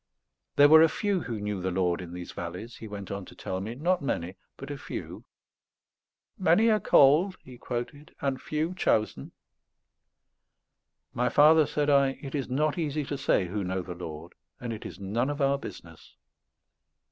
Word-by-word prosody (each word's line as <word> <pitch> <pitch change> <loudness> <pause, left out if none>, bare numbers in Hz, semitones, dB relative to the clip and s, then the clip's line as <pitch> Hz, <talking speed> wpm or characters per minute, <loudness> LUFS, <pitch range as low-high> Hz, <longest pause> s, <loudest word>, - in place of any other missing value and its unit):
There 145 - +7
were 160 +1 +8
a 160 - +6
few 200 +2 0
who 115 -7 -4
knew 105 -2 -3
the 95 - -1
Lord 90 -1 0
in 85 -2 -8
these 90 0 -7
valleys, 90 +7 -7
he 110 - -9
went 100 -2 -7
on 100 0 -4
to - - -14
tell 95 0 -4
me; 110 +4 -5
not 175 +7 +1
many, 90 -9 -3 0.2
but 135 +1 -8
a 145 - -5
few. - - -7 1.1
"Many 195 +6 +4
are 215 - +3
called," 165 +8 +5
he 125 -2 -13
quoted, 130 +5 -6
"and 135 -2 -2
few 155 +3 -2
chosen." 110 - 0 1.8
"My 125 +1 +1
father," 155 +1 +6
said 150 -1 0
I, 140 -1 +3
"it 135 - -8
is 140 -4 -2
not 150 +5 0
easy 150 -2 -1
to 140 - -4
say 130 -8 +1
who 100 +3 -3
know 95 0 -2
the 90 - -6
Lord; 85 -1 -8 0.3
and 120 -2 -4
it 110 - -7
is - - -11
none 110 +7 -1
of 145 0 -4
our 140 0 +2
business. 85 - -11
130 Hz, 180 wpm, -28 LUFS, 95-150 Hz, 1.8 s, were